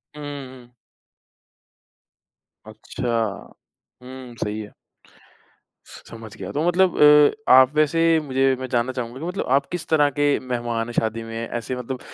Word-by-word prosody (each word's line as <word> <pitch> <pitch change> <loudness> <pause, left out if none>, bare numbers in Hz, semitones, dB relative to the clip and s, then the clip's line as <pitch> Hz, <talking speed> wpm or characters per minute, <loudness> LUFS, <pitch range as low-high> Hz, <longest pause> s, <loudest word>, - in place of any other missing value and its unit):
हुँ, 150 - -9 0.3
हुँ, 130 - -13
हुँ। 120 0 -18 1.9
अच्छा। 125 - -7 1.0
हुँ, 130 -1 -10
सही 105 +1 -3
है। 105 -1 -8 1.1
समझ 115 -2 -12
गया, - - -7
तो 150 +3 -2
मतलब 180 +1 +2 0.5
अ, - - +3
आप 130 +1 +7
वैसे 155 +2 +2 0.2
मुझे 135 -1 +1
मैं 130 - -5
जानना 120 +1 0
चाहूँगा 125 0 -6
कि 160 - -6
मतलब 180 +3 -3
आप 140 - +1
किस 175 -2 -4
तरह 150 -2 +3
के 145 - +3
मेहमान 120 -2 -3
हैं 120 - -7
शादी 115 0 -2
में 115 +1 -6
ऐसे 120 +2 -4
मतलब 125 +1 -6
130 Hz, 150 wpm, -22 LUFS, 115-145 Hz, 1.9 s, आप